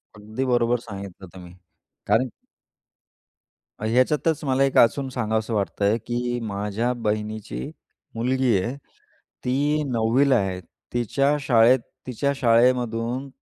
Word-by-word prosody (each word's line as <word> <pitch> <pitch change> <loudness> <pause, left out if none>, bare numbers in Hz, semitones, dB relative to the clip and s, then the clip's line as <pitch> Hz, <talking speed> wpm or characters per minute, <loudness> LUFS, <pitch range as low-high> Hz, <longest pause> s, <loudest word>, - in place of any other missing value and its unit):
अगदी 110 +5 -4
बरोबर 120 -1 +2
सांगितलं 100 -4 -9
तुम्ही. 90 -2 -11 0.5
कारण 130 -1 +2 1.5
ह्याच्यातच 130 +8 +1
मला 135 0 +2
एक 135 - +1
अजून 135 +3 +4
सांगावसं 110 -2 -2
वाटतंय 100 +1 +1
की 120 0 -2
माझ्या 105 +3 -2
बहिणीची 105 - -3 0.5
मुलगी 125 0 +1
आहे. 120 +8 -3 0.7
ती 145 +4 +1
9वी 120 +4 +2
ला 130 - +5
आहे. 95 -4 0 0.3
तिच्या 135 +5 +1
शाळेत 125 -2 +4 0.3
तिच्या 130 +3 -1
शाळेमधून 120 0 +2
120 Hz, 105 wpm, -24 LUFS, 110-130 Hz, 1.5 s, ला